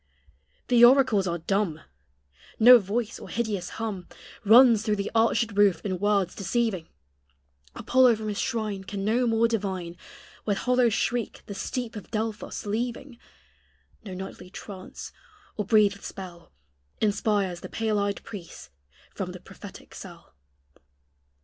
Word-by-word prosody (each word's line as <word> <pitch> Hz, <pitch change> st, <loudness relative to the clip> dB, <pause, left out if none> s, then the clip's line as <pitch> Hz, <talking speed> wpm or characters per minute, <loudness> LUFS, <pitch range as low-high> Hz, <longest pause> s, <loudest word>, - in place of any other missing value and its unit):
The 240 Hz, -1 st, +5 dB
oracles 240 Hz, -6 st, +5 dB
are 170 Hz, -1 st, -1 dB
dumb: 175 Hz, -1 st, -1 dB, 0.8 s
No 245 Hz, +2 st, +9 dB
voice 220 Hz, +3 st, -3 dB
or -, -, -10 dB
hideous 210 Hz, -6 st, -3 dB
hum 210 Hz, -5 st, -4 dB, 0.4 s
Runs 230 Hz, +1 st, +7 dB
through 215 Hz, -1 st, 0 dB
the 200 Hz, 0 st, -3 dB
arched 230 Hz, 0 st, +2 dB
roof 200 Hz, -4 st, +3 dB
in 185 Hz, -3 st, -2 dB
words 200 Hz, -3 st, +1 dB
deceiving; 200 Hz, -3 st, -1 dB, 0.9 s
Apollo 255 Hz, -2 st, +4 dB
from 215 Hz, 0 st, -6 dB
his 205 Hz, -, -3 dB
shrine 215 Hz, -5 st, -2 dB
Can 195 Hz, 0 st, -5 dB
no 240 Hz, +3 st, +2 dB
more 225 Hz, 0 st, +3 dB
divine, 190 Hz, -6 st, -3 dB, 0.5 s
With 205 Hz, -2 st, 0 dB
hollow 250 Hz, +2 st, +2 dB
shriek 235 Hz, +1 st, -2 dB
the 200 Hz, -, -7 dB
steep 235 Hz, +4 st, -4 dB
of 210 Hz, -, -9 dB
Delphos 220 Hz, -1 st, -4 dB
leaving; 235 Hz, +4 st, -4 dB, 0.8 s
No 190 Hz, -4 st, -7 dB
nightly 180 Hz, -1 st, -8 dB
trance, 190 Hz, 0 st, -9 dB, 0.4 s
or 210 Hz, -3 st, -3 dB
breathèd 205 Hz, -2 st, +3 dB
spell, 175 Hz, -3 st, -9 dB, 0.5 s
Inspires 205 Hz, -4 st, 0 dB
the -, -, -9 dB
pale 220 Hz, -2 st, -1 dB
eyed 200 Hz, 0 st, -2 dB
priest 185 Hz, -, -10 dB, 0.4 s
from -, -, -5 dB
the -, -, -9 dB
prophetic -, -, -13 dB
cell. -, -, -12 dB
210 Hz, 135 wpm, -26 LUFS, 195-230 Hz, 0.9 s, No